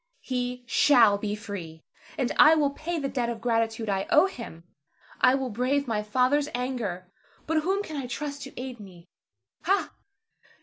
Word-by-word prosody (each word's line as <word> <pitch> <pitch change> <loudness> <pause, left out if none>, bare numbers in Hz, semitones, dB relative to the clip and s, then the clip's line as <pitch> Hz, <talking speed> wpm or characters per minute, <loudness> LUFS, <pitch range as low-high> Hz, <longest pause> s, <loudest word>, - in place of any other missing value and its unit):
He 250 -1 -3
shall 230 -6 +5
be 210 0 -2
free, 190 -7 -8 0.3
and 260 -4 0
I 310 +2 +8
will 290 -3 +2
pay 335 +4 -4
the 280 -3 -2
debt 245 -3 -2
of 235 -1 -4
gratitude 225 -1 0
I 195 -1 -1
owe - - +6
him. 230 - -8 0.6
I 255 - +6
will 265 -2 -3
brave 255 +5 0
my 215 -3 0
father's 255 +7 +1
anger; 220 -8 -4 0.3
but 320 +1 0
whom 385 +5 0
can 310 -6 -7
I 265 -3 -4
trust 285 +2 -5
to 270 - -9
aid 255 -2 -6
me? 180 -4 -13 0.6
Ha! 395 +2 +1
250 Hz, 170 wpm, -27 LUFS, 210-280 Hz, 0.6 s, I